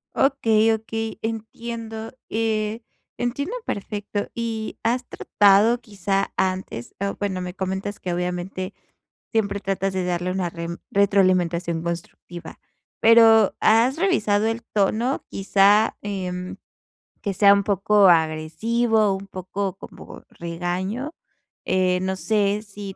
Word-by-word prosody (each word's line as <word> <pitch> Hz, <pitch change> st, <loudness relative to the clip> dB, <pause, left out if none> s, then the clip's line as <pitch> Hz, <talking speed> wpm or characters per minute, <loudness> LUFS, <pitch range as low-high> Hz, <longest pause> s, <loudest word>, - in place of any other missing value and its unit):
Okey, 225 Hz, -5 st, +3 dB
okey. 225 Hz, 0 st, -4 dB
Entiendo, 225 Hz, 0 st, -5 dB, 0.2 s
eh, 220 Hz, 0 st, -1 dB, 0.4 s
entiendo 280 Hz, -, -2 dB
perfecto. 205 Hz, 0 st, -4 dB
Y, 225 Hz, -2 st, -4 dB
¿has 240 Hz, +2 st, 0 dB
tratado 205 Hz, +4 st, +3 dB
quizá 195 Hz, -3 st, -2 dB
antes? 185 Hz, -10 st, -2 dB
O 200 Hz, 0 st, -1 dB
bueno, 190 Hz, -3 st, -2 dB
me 180 Hz, 0 st, -5 dB
comentas 190 Hz, +1 st, -4 dB
que 180 Hz, -, -4 dB
obviamente 180 Hz, +2 st, -3 dB, 0.6 s
siempre 200 Hz, -3 st, 0 dB
tratas 195 Hz, 0 st, -2 dB
de 185 Hz, -1 st, -1 dB
darle 180 Hz, 0 st, -1 dB
una 185 Hz, -2 st, -1 dB
rem- 170 Hz, 0 st, -6 dB
retroalimentación 180 Hz, -4 st, +2 dB
constructiva, 170 Hz, 0 st, -7 dB, 0.4 s
pero, 225 Hz, -2 st, +6 dB
¿has 235 Hz, +6 st, +4 dB
revisado 220 Hz, -, +2 dB
el 225 Hz, +1 st, -2 dB
tono, 220 Hz, +6 st, +1 dB
quizá, 200 Hz, +2 st, +3 dB
em, 185 Hz, -3 st, -4 dB, 0.6 s
que 200 Hz, -2 st, -2 dB
sea 200 Hz, 0 st, +7 dB
un 200 Hz, 0 st, +2 dB
poco 200 Hz, 0 st, +4 dB
agresivo, 195 Hz, +8 st, +2 dB
un 195 Hz, +1 st, -8 dB
poco 190 Hz, +1 st, -4 dB
como -, -, -12 dB
regaño? 180 Hz, -, -4 dB, 0.5 s
Eh, 185 Hz, -1 st, +2 dB
no 190 Hz, 0 st, -1 dB
sé 205 Hz, +1 st, 0 dB
si 200 Hz, -2 st, -9 dB
200 Hz, 120 wpm, -23 LUFS, 185-225 Hz, 0.6 s, sea